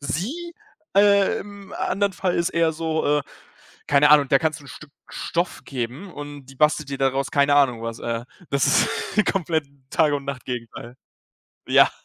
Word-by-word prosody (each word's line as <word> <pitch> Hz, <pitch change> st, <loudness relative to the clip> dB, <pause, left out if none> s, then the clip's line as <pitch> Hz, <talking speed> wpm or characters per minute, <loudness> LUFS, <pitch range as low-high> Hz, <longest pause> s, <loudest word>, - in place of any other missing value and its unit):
Sie, 275 Hz, -, -4 dB, 0.4 s
äh, 200 Hz, -1 st, +5 dB
im 200 Hz, -1 st, -11 dB
anderen 200 Hz, 0 st, 0 dB
Fall 185 Hz, -1 st, -1 dB
ist 170 Hz, -, +1 dB
eher 165 Hz, -1 st, +2 dB
so, 160 Hz, -2 st, 0 dB
äh, -, -, -3 dB, 0.7 s
keine 145 Hz, +1 st, +5 dB
Ahnung, 145 Hz, -2 st, +6 dB
der 135 Hz, -, +5 dB
kannst 160 Hz, 0 st, -1 dB
du -, -, -16 dB
'n -, -, -13 dB
Stück 155 Hz, -2 st, -12 dB, 0.2 s
Stoff 170 Hz, +1 st, -3 dB
geben 135 Hz, +8 st, -5 dB
und 145 Hz, -2 st, -8 dB
die 135 Hz, -, -14 dB
bastelt 150 Hz, 0 st, +2 dB
dir 140 Hz, -, -4 dB
daraus 135 Hz, 0 st, 0 dB
keine 145 Hz, 0 st, +4 dB
Ahnung 125 Hz, -5 st, +3 dB
was. 115 Hz, 0 st, -5 dB
Äh, 115 Hz, 0 st, -3 dB, 0.3 s
das 140 Hz, -2 st, +2 dB, 0.5 s
ist 215 Hz, -, +3 dB
komplett 160 Hz, -6 st, 0 dB, 0.2 s
Tag 150 Hz, -2 st, +3 dB
und 140 Hz, -1 st, -2 dB
Nacht-Gegenteil. 125 Hz, -3 st, -6 dB, 0.7 s
Ja. -, -, +6 dB
145 Hz, 170 wpm, -23 LUFS, 135-170 Hz, 0.7 s, Ahnung